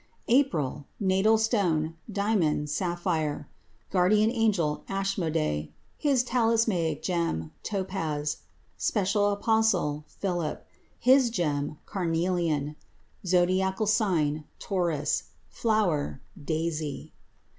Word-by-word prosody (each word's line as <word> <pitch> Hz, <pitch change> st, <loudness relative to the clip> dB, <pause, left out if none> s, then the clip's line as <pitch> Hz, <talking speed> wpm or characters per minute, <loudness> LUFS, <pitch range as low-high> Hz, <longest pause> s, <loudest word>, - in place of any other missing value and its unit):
APRIL 165 Hz, -, +1 dB
Natal 195 Hz, +2 st, +3 dB
stone 180 Hz, -8 st, +1 dB, 0.2 s
Diamond, 185 Hz, -8 st, +1 dB
sapphire. 165 Hz, -4 st, -1 dB, 0.4 s
Guardian 210 Hz, +4 st, +4 dB
angel 205 Hz, -11 st, +1 dB
Ashmodei. 160 Hz, -, -1 dB, 0.3 s
His 275 Hz, -4 st, +2 dB
talismanic 225 Hz, -, +1 dB
gem 165 Hz, -, -1 dB
Topaz. 165 Hz, -7 st, -2 dB, 0.4 s
Special 205 Hz, 0 st, +1 dB
apostle 205 Hz, -8 st, +1 dB
Philip. 175 Hz, -5 st, -3 dB, 0.3 s
His 260 Hz, 0 st, +5 dB
gem 150 Hz, -8 st, -1 dB
Carnelian. 165 Hz, -5 st, -1 dB, 0.5 s
Zodiacal 185 Hz, +3 st, +2 dB
sign 170 Hz, -9 st, +1 dB
Taurus. 175 Hz, -7 st, -1 dB, 0.2 s
Flower 200 Hz, -, 0 dB, 0.2 s
Daisy. 155 Hz, -1 st, -3 dB
180 Hz, 80 wpm, -28 LUFS, 155-210 Hz, 0.5 s, His